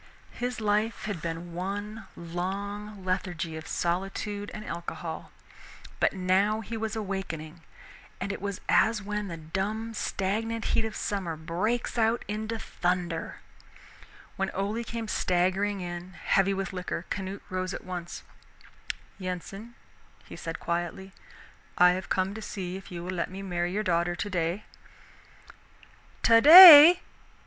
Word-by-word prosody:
His 245 0 -4
life 215 +1 0
had 205 -7 -4
been 170 +1 -5
one 205 +4 -5
long 195 +4 -5
lethargy 175 -3 -2
of 160 0 -8
solitude 195 +4 -3
and 215 0 -8
alcohol, 170 0 -6 0.7
but - - +3
now 195 +3 +1
he 225 +2 -6
was 220 0 -3
awakening, 180 -6 -5 0.6
and 200 - -3
it - - -6
was 200 -1 -4
as 225 0 +3
when 210 0 -3
the 170 -3 -6
dumb 200 +8 -4
stagnant 220 +3 -2
heat 225 - +2
of 220 0 -5
summer 190 -5 -3
breaks 190 +10 -2
out 225 +1 +1
into 220 +2 -3
thunder. 175 -5 -3 1.0
When 195 0 -1
Ole 205 +4 -2
came 230 0 -5
staggering 190 +2 0
in, 175 +1 -7
heavy 195 +2 +1
with 195 0 -4
liquor, 180 -1 -4
Canute 195 0 -4
rose 185 0 -2
at - - -6
once. 175 -2 -6 1.0
"Yensen," 195 +5 -6 0.5
he - - -10
said 165 0 -6
quietly, 175 +3 -4 0.6
"I 180 0 +7
have 185 0 -4
come 190 +1 0
to 220 - -7
see 185 -3 -5
if 190 0 -10
you 170 -1 -6
will 180 - -4
let 175 - -2
me 190 +2 -8
marry 175 -2 -2
your 210 +3 -1
daughter 175 -2 0
today." 180 +1 -2 1.6
"Today!" 315 +7 +11
195 Hz, 135 wpm, -28 LUFS, 175-215 Hz, 1.6 s, Today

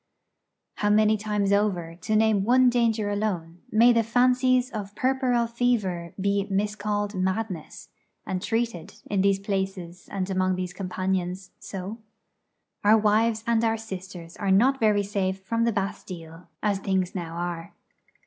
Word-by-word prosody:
How 205 - +1
many 215 +1 +4
times 210 -1 -1
over, 190 -5 0
to 200 +5 -2
name 215 -2 +3
one 250 +3 +5
danger 225 -3 +1
alone, 180 -5 -2
may 235 +3 +6
the 230 - +4
fancies 250 +2 +2
of 205 -2 -6
puerperal 255 -2 +1
fever 225 -8 -1
be 200 +1 0
miscalled 205 +1 -1
madness, 185 -2 -3 0.4
and 185 -1 -3
treated 225 -6 -2 0.2
in 200 -2 +2
these 195 0 +3
places 190 -3 -4
and 190 -2 -2
among 185 0 +1
these 180 -1 -4
companions 185 -1 -3
so? 195 +4 -6 0.8
Our 210 +2 +6
wives 220 +1 +2
and 230 -1 +2
our 225 0 +2
sisters 190 -5 -8
are 200 - -2
not 250 +8 +4
very 210 -2 +3
safe 195 -2 -2
from 230 +3 0
the 235 - +2
Bastille, 180 -5 -5 0.2
as 205 -2 +1
things 190 -2 -1
now 170 -3 -5
are. 170 -1 -5
205 Hz, 145 wpm, -26 LUFS, 185-225 Hz, 0.8 s, may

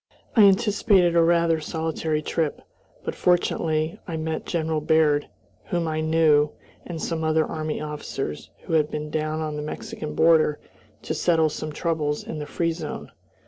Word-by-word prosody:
I 215 -4 +8
anticipated 195 -3 +4
a 170 - +6
rather 170 -1 +3
solitary 160 0 -2
trip; 155 -2 -2 0.4
but, - - -2
fortunately, 160 -3 +1
I 165 -3 -3
met 160 0 -3
General 160 -2 -1
Baird, 150 -1 +3 0.4
whom 170 -2 -1
I 155 0 -1
knew, 155 -2 +3 0.3
and 170 -2 -5
some 160 0 -2
other 160 0 +2
army 155 -1 -3
officers, 150 - -5
who - - -5
had 155 -2 +3
been 150 0 -5
down 155 0 -1
on 155 -1 -3
the - - -3
Mexican 150 0 -6
border 160 -2 +4 0.4
to - - -2
settle 160 -3 +2
some 155 +1 -5
troubles 150 -2 -1
in 155 - -6
the 150 - -5
"free 165 -1 0
zone." 160 -2 -6
160 Hz, 160 wpm, -24 LUFS, 150-165 Hz, 0.4 s, I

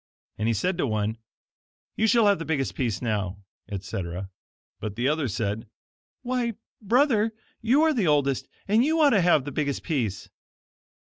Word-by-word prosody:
And 110 - 0
he 115 - +2
said 180 - -1
to 140 - +1
one: 110 0 -1 0.8
"You 220 - +2
shall 230 0 +4
have 200 -1 +4
the - - -3
biggest 150 -5 -1
piece 120 -3 -2
now," 100 -5 -1 0.3
etc. 95 -2 -5 0.5
But 105 -2 -5
the 120 +3 0
other 150 -1 +1
said: 110 +1 -3 0.6
"Why, 245 -2 -1 0.3
brother, 225 -1 +2 0.3
you 255 +7 +4
are 320 -1 +4
the 220 - +1
oldest, 140 -3 +2 0.2
and 215 +4 +4
you 320 +3 +2
ought 295 -3 +6
to 200 - +4
have 170 -6 +4
the 145 - -4
biggest 140 0 -2
piece." 120 - -2
145 Hz, 165 wpm, -26 LUFS, -, 0.8 s, ought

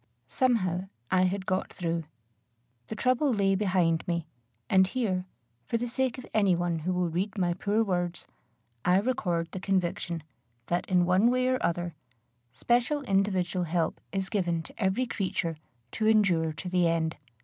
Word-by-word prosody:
Somehow 190 - +1 0.2
I 185 0 +4
had 190 +1 -1
got 185 0 -1
through. 165 -2 -2 0.8
The - - -5
trouble 255 +4 +2
lay 200 -4 +2
behind 185 -5 +1
me; 170 -2 -1 0.4
and 190 +4 +5
here, 190 -5 -1 0.4
for 230 - +1
the 245 +1 -2
sake 260 +1 -1
of 255 - -8
any 200 -4 +4
one 170 -1 -1
who 175 +4 -2
will 180 -1 +1
read 195 +5 -2
my 175 -2 +1
poor 205 +5 +1
words, 175 -4 -2 0.6
I 180 +1 +4
record 180 -7 0
the 190 - -5
conviction, 175 -3 -1 0.4
that, 175 +5 -1
in 180 -2 +4
one 185 +6 +4
way 255 +1 +2
or 255 0 0
other, 175 0 -1 0.6
special 245 - +1
individual 190 -4 +1
help 165 0 -1
is 190 0 -2
given 175 -5 0
to 220 - -7
every 190 +7 +1
creature 185 -7 -2 0.3
to 215 - 0
endure 185 -7 +3
to 155 +4 -7
the 180 -1 +2
end. 165 -1 0
185 Hz, 160 wpm, -28 LUFS, 175-215 Hz, 0.8 s, and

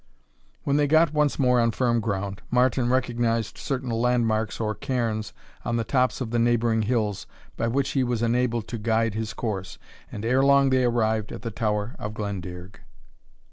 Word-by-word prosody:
When 140 0 +1
they 145 -1 +3
got 155 +1 +4
once 150 -2 +2
more 125 -3 +3
on 115 0 +3
firm 120 0 +1
ground, 100 -2 -3
Martin 125 0 +2
recognized 120 -4 0
certain 130 -3 -3
land 120 +1 +2
marks, 110 -1 -1
or 110 -1 -1
cairns, 115 -5 -2 0.3
on 120 - -1
the 115 - 0
tops 125 0 +1
of 115 -3 -3
the 120 - +1
neighbouring 115 -1 +2
hills, 110 -3 -1 0.3
by 115 - -1
which 135 +3 0
he 135 - +1
was 120 -2 -1
enabled 120 -1 0
to 115 - -4
guide 115 0 +1
his 110 +1 -4
course, 95 -5 -4 0.3
and 105 - -6
ere 130 +3 +3
long 140 -1 +5
they 130 -1 +3
arrived 110 -3 0
at - - -8
the 115 - -3
Tower 105 0 -2
of 105 +1 -5
Glendearg. 95 -3 -6
115 Hz, 180 wpm, -25 LUFS, 110-125 Hz, 0.3 s, long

